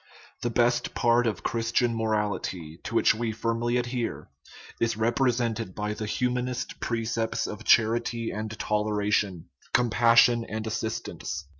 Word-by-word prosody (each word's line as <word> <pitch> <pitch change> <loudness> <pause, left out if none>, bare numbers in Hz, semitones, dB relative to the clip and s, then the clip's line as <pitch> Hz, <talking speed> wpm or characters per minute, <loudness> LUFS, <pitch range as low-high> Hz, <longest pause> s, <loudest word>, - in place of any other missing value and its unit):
The 120 - 0
best 120 +1 +1
part 120 0 +3
of 110 - -2
Christian 115 +1 0
morality, 105 -7 -2
to - - -4
which - - +5
we 115 +1 -2
firmly 115 +2 -1
adhere, 120 -1 -3 0.5
is 115 -2 0
represented 115 -3 0
by 105 0 -2
the 110 0 -5
humanist 125 +2 -2
precepts 115 -1 -1
of 105 +1 -6
charity 115 0 +3
and 110 +1 -4
toleration, 105 -4 0 0.2
compassion 120 0 +5
and 110 -1 -5
assistance. 110 -8 -4
115 Hz, 125 wpm, -27 LUFS, 110-120 Hz, 0.5 s, which